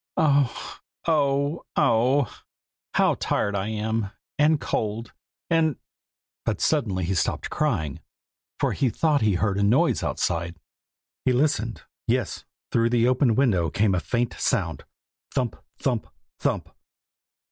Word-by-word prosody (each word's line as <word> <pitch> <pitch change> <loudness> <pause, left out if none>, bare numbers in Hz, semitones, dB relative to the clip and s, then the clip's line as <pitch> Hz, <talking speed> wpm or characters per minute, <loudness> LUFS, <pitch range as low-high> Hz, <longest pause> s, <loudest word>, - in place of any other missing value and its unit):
Oh! 140 -4 +1 0.3
oh! 145 0 +1
oh! 125 +4 +2 0.5
how - - +4
tired 100 - 0
I 100 +1 -1
am, 110 -1 -1 0.3
and 150 0 +4
cold, 110 -1 -2 0.3
and 160 -3 +2 0.4
' - - -88
but - - -1
suddenly 95 -5 +1
he 95 - 0
stopped 85 - -1
crying, 105 - -1 0.6
for - - +2
he 130 - +1
thought 150 +3 +2
he 105 -3 +3
heard 100 +1 +1
a - - +2
noise 110 +6 +3
outside. 85 0 -1 0.7
He 130 - +3
listened. 125 -4 0 0.2
Yes, - - -1 0.3
through 115 0 +3
the 120 0 +3
open 125 -2 +3
window 100 -11 +3
came 100 -1 +2
a 90 - +2
faint 120 +5 -1
sound - - 0 0.5
thump! 125 -5 0 0.2
thump! - - -1 0.3
thump! - - -1
115 Hz, 130 wpm, -25 LUFS, 100-140 Hz, 0.7 s, how